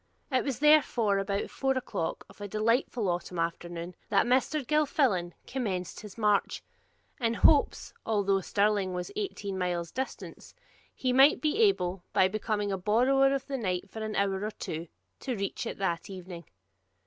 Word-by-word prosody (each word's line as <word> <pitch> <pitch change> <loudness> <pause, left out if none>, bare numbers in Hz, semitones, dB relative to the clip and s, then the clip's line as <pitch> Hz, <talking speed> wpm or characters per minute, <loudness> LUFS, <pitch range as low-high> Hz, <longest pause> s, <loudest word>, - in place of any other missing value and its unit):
It 255 -1 +2
was 270 -5 -2
therefore 260 -9 +4
about 200 0 -2
four 270 -1 0
o'clock 165 -9 -3
of - - -17
a 205 - -4
delightful 225 +1 0
autumn 175 0 -2
afternoon 170 +1 -3 0.2
that 200 -2 +3
Mr. 260 +4 +1
Gilfillan 270 - +1
commenced 195 -9 -3
his 210 -1 -11
march, 210 -3 +1 0.6
in 230 -2 0
hopes, 290 +2 +3
although 200 -3 +1
Stirling 200 -1 +1
was 180 0 -4
eighteen 210 - -4
miles 175 -2 -2
distant, 265 +1 -6 0.4
he 255 -1 0
might 270 +4 +6
be 310 +7 0
able, 190 - +2
by 185 - +5
becoming 210 0 -2
a 195 - -2
borrower 255 +7 +3
of 275 0 -4
the 275 -2 -4
night 185 -3 -2
for 220 - -7
an 215 0 -3
hour 195 0 0
or 215 - -1
two, 165 -5 -6 0.3
to 255 -3 -3
reach 200 -1 -3
it - - -5
that 170 -3 -2
evening. 180 -3 -8
210 Hz, 160 wpm, -29 LUFS, 185-260 Hz, 0.6 s, might